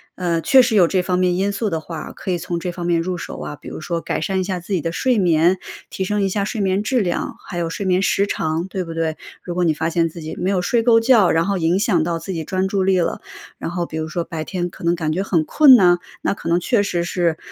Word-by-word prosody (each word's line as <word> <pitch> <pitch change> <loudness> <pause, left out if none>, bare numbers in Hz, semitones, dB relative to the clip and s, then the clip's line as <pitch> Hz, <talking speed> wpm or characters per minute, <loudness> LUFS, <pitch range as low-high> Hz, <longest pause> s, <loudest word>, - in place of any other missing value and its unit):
呃， 170 -2 -1
确 265 +7 +6
实 240 -2 +1
有 180 -5 +6
这 185 0 +1
方 180 0 -1
面 180 -1 +2
因 195 +2 0
素 205 +1 -2
的 160 - -1
话， 160 0 -7
可 - - -8
以 175 - +1
从 170 0 -4
这 180 0 -3
方 175 0 -6
面 170 -1 +2
入 180 +1 -3
手 - - -7
啊。 150 - -6
比 - - -14
如 - - -7
说 170 +1 -2
改 - - -3
善 190 -2 -1
一 185 - 0
下 185 -1 -3
自 190 +3 -6
己 180 - +2
的 165 - -2
睡 250 +6 +1
眠， 175 0 +3 0.3
提 190 - -3
升 205 +2 -1
一 195 - +1
下 200 +1 -1
睡 215 0 -3
眠 190 +1 +1
质 250 +2 +1
量， 175 -3 -2
还 175 - -6
有 170 -1 -1
睡 190 +4 -4
眠 185 0 +2
时 200 0 +1
长， 160 0 -2
对 190 -1 -3
不 165 -1 -7
对？ 160 -1 -1 0.3
如 175 -1 -5
果 180 - +1
你 160 -2 +3
发 160 +2 -2
现 165 0 +1
自 165 +1 -10
己 155 - -6
没 185 - 0
有 185 -2 +1
睡 230 +5 +1
够 230 -1 +5
觉， 225 -5 +4
然 165 +1 +2
后 200 -1 0
影 170 +3 +1
响 185 -7 +2
到 165 0 -2
自 190 +4 -6
己 165 -3 -3
专 190 +3 -1
注 195 -1 0
力 190 -1 +3
了。 170 - -1 0.4
然 165 - -5
后 175 -1 -2
比 160 - -6
如 160 0 -3
说 170 +2 -3
白 160 -2 -5
天 175 -1 -3
可 - - -14
能 170 +1 +2
感 155 -2 -2
觉 185 +5 -1
很 170 -5 +1
困 290 -4 +7
呐， 175 -6 +5 0.2
那 - - 0
可 - - -9
能 170 +1 +3
确 210 +2 +1
实 175 -4 -1
是 170 -2 0
180 Hz, 315 characters per minute, -20 LUFS, 165-195 Hz, 0.4 s, 困